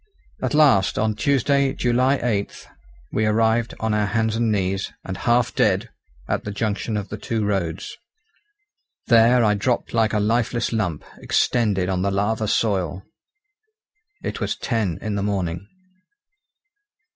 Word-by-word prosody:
At - - -1
last, 135 -11 +4
on 110 0 +1
Tuesday, 140 +3 +1
July 125 +3 +2
8, 105 -5 -2 0.4
we 110 0 +1
arrived 115 +2 +1
on 110 -1 -1
our 105 -1 +1
hands 110 0 0
and 115 -1 +1
knees, 95 -1 -1
and 95 - -4
half 120 +3 +1
dead, - - +1 0.4
at - - -1
the - - -5
junction 105 +1 -2
of 100 -1 -5
the - - -6
two 110 -2 -2
roads. 95 -5 -2 1.1
There 120 +1 +5
I 105 - +3
dropped 115 +4 -1
like 110 -2 +2
a 105 - +2
lifeless 115 +2 0
lump, 90 -9 -2
extended 105 -6 +1
on 95 -1 -1
the 100 - +1
lava 105 +3 0
soil. 95 -4 0 1.2
It - - -4
was - - -1
ten 110 -9 -1
in 110 - -2
the 100 - -1
morning. 95 -3 -2
110 Hz, 145 wpm, -22 LUFS, 100-115 Hz, 1.2 s, There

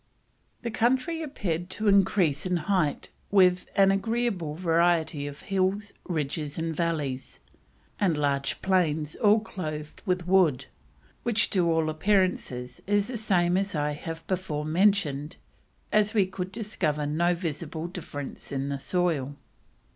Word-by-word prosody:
The 235 - -2
country 260 +9 +1
appeared 180 - -3
to 215 +3 -3
increase 190 -6 +3
in 180 -1 +1
height 170 -3 0 0.2
with: 185 -2 +4
"an 195 -1 +6
agreeable 195 -6 -1
variety 165 -3 +1
of 145 0 -8
Hills, 195 +2 -1
Ridges, 150 -3 -3
and 165 -1 -2
Valleys, 145 -6 -2 0.6
and 180 -7 +2
large 140 -2 -1
plains 160 -5 +1
all 215 -1 +5
clothed 155 -8 -6
with 180 -3 -1
wood, 180 -8 +3 0.6
which 230 -1 +1
to 175 -4 +3
all 160 -1 +2
appearance 185 +3 +1
is 125 0 -7
the 205 0 +3
same 180 -5 +2
as 195 -2 -1
I 150 0 0
have 160 +2 -6
before 175 -6 -2
mentioned 160 -4 +1 0.6
as 215 +1 +2
we 200 -3 +5
could 185 0 -5
discover 190 -9 -1
no 170 +4 +1
visible 165 -1 -4
difference 165 -6 -6
in 135 0 -2
the 140 -1 -3
soil." 155 -4 0
175 Hz, 135 wpm, -27 LUFS, 150-195 Hz, 0.6 s, an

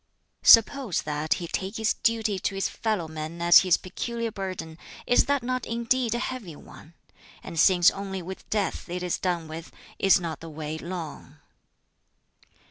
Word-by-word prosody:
"Suppose 230 - +5
that 150 +1 -1
he 175 - -5
take 190 +5 -4
his 220 0 +1
duty 225 -4 0
to 195 - -2
his 195 - 0
fellow 215 -7 -2
men 155 +1 -7
as 170 0 +8
his 185 -2 +3
peculiar 230 +4 -4
burden, 185 -5 -6 0.3
is 245 - +4
that 285 -3 0
not 255 0 -2
indeed 235 0 0
a - - 0
heavy 240 - -5
one? 155 +2 -15 0.5
And 165 - -5
since 175 +1 +6
only 195 -2 -5
with 190 +2 -9
death 205 -3 -2
it 180 +1 -4
is 180 - -1
done 175 -3 -2
with, 160 +1 -8 0.3
is 195 -1 +5
not 165 -4 -5
the 165 - -9
way 155 0 -6
long?" 160 -4 -7
185 Hz, 165 wpm, -26 LUFS, 165-225 Hz, 0.5 s, as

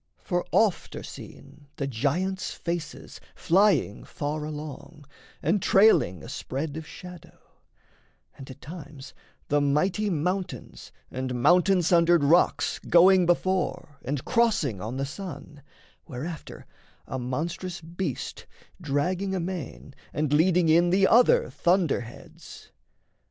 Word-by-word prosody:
For 175 -2 -2
oft 215 -5 +1
are - - -6
seen 145 -1 -12
The 140 - -3
giants' 160 +10 -2
faces 170 -2 -6
flying 190 - +2
far 150 +1 -4
along 150 0 -8 0.4
And 185 +6 +1
trailing 195 - +4
a - - -9
spread 145 +3 -5
of 160 0 -7
shadow; 180 -2 -12 1.0
and 135 - -11
at 130 - -11
times 150 -2 -10 0.4
The 145 0 +2
mighty 185 +9 +1
mountains 180 +3 -3 0.2
and 130 0 -3
mountain 180 +1 +4
sundered 170 -1 +4
rocks 165 +5 +2
Going 180 +1 +5
before 175 -4 -1
and 135 +1 -3
crossing 215 - +1
on 115 +6 -5
the 135 - -1
sun, 150 -1 -9 0.5
Whereafter 150 +5 -7 0.4
a 130 - -5
monstrous 170 +9 -4
beast 170 +3 -5 0.3
dragging 180 +6 -1
amain 175 -6 -5 0.2
And 150 -1 -1
leading 170 +2 +3
in 170 +2 +4
the 190 +2 +4
other 480 - +4
thunderheads. 170 -10 -2
165 Hz, 115 wpm, -26 LUFS, 145-185 Hz, 1.0 s, Going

